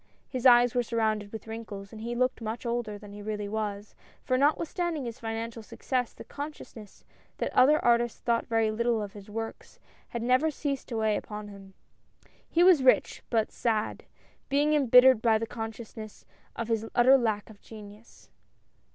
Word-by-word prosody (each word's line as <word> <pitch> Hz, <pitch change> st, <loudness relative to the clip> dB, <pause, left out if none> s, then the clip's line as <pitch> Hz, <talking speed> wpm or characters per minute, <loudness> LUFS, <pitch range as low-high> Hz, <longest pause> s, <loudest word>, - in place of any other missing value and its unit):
His 255 Hz, -1 st, +1 dB
eyes 245 Hz, -1 st, +6 dB
were 245 Hz, -, +2 dB
surrounded 220 Hz, -3 st, -1 dB
with 220 Hz, -2 st, -8 dB
wrinkles, 220 Hz, -3 st, -8 dB
and 215 Hz, -, -9 dB
he 235 Hz, +1 st, -4 dB
looked 255 Hz, 0 st, 0 dB
much 225 Hz, +2 st, -5 dB
older 235 Hz, -3 st, -2 dB
than 205 Hz, -1 st, -12 dB
he 205 Hz, -, -9 dB
really 210 Hz, -1 st, -4 dB
was, 205 Hz, -1 st, -4 dB, 0.3 s
for 255 Hz, -, 0 dB
notwithstanding 315 Hz, +2 st, 0 dB
his 235 Hz, +1 st, -6 dB
financial 225 Hz, 0 st, -5 dB
success, 245 Hz, +2 st, -3 dB
the -, -, -12 dB
consciousness 285 Hz, -8 st, -9 dB, 0.3 s
that -, -, -3 dB
other 285 Hz, +4 st, +6 dB
artists 240 Hz, -1 st, +2 dB
thought 235 Hz, -1 st, 0 dB
very 225 Hz, -1 st, +1 dB
little 235 Hz, +1 st, 0 dB
of 205 Hz, -1 st, -5 dB
his 205 Hz, -1 st, -12 dB
works, 225 Hz, +1 st, -7 dB, 0.3 s
had 235 Hz, -1 st, -5 dB
never 255 Hz, +6 st, +3 dB
ceased 280 Hz, -2 st, -4 dB
to 235 Hz, -, -4 dB
weigh 220 Hz, -1 st, +1 dB
upon 210 Hz, -1 st, -7 dB
him. 195 Hz, -1 st, -13 dB, 0.7 s
He 340 Hz, -, +3 dB
was 360 Hz, -6 st, +6 dB
rich, 260 Hz, -1 st, +3 dB
but 225 Hz, -2 st, +1 dB
sad, 220 Hz, -3 st, -2 dB, 0.4 s
being 290 Hz, +2 st, +2 dB
embittered 260 Hz, -4 st, +6 dB
by 225 Hz, -2 st, +4 dB
the 225 Hz, -, -3 dB
consciousness 225 Hz, -1 st, -8 dB, 0.3 s
of 230 Hz, -, -4 dB
his 225 Hz, -2 st, 0 dB
utter 255 Hz, +3 st, +6 dB
lack 220 Hz, -4 st, -1 dB
of 200 Hz, -, -18 dB
genius. 210 Hz, 0 st, -14 dB
230 Hz, 170 wpm, -28 LUFS, 215-250 Hz, 0.7 s, eyes